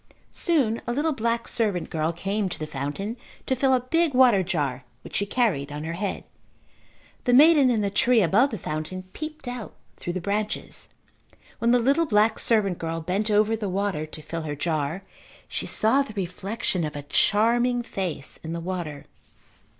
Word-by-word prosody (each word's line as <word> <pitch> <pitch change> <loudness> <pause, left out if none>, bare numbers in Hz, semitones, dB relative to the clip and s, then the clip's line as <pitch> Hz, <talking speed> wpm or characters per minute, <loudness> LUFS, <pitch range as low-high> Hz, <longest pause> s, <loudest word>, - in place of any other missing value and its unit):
Soon 270 -10 +1
a 240 - 0
little 305 +4 +1
black 235 -2 -1
servant 205 -7 -1
girl 160 -1 0
came 195 +4 -2
to - - -3
the 155 - -4
fountain 150 - -4 0.3
to 260 - +1
fill 265 +1 +2
a 260 - +4
big 325 +3 +1
water 250 -6 +6
jar 145 -8 -2 0.2
which - - -9
she 200 - -1
carried 195 - 0
on 150 +1 -5
her 165 +1 -3
head. 195 +3 -3 1.0
The 245 - +3
maiden 290 0 +7
in 230 -3 +2
the 200 -1 0
tree 230 +2 +4
above 210 - +4
the 220 - -4
fountain 155 +3 -4
peeped 310 -3 -7
out 245 -3 -6 0.2
through 175 - -4
the 185 - -2
branches. 205 +3 -3 0.7
When 230 - +2
the 245 - +6
little 275 +7 +2
black 215 -1 +3
servant 205 -6 +2
girl 165 0 -3
bent 190 +7 -1
over 215 +1 +3
the 210 -3 -3
water 190 -5 -1
to 155 - -9
fill 165 +2 -4
her 150 -2 -4
jar 155 +3 -2 0.4
she - - -3
saw 240 +6 +3
the 275 -6 -5
reflection 190 0 -2
of 150 -1 -4
a 145 - -5
charming 240 - +2
face 175 -10 -5
in 160 +1 -4
the 170 - -3
water. 165 -5 -5
205 Hz, 180 wpm, -25 LUFS, 165-240 Hz, 1.0 s, maiden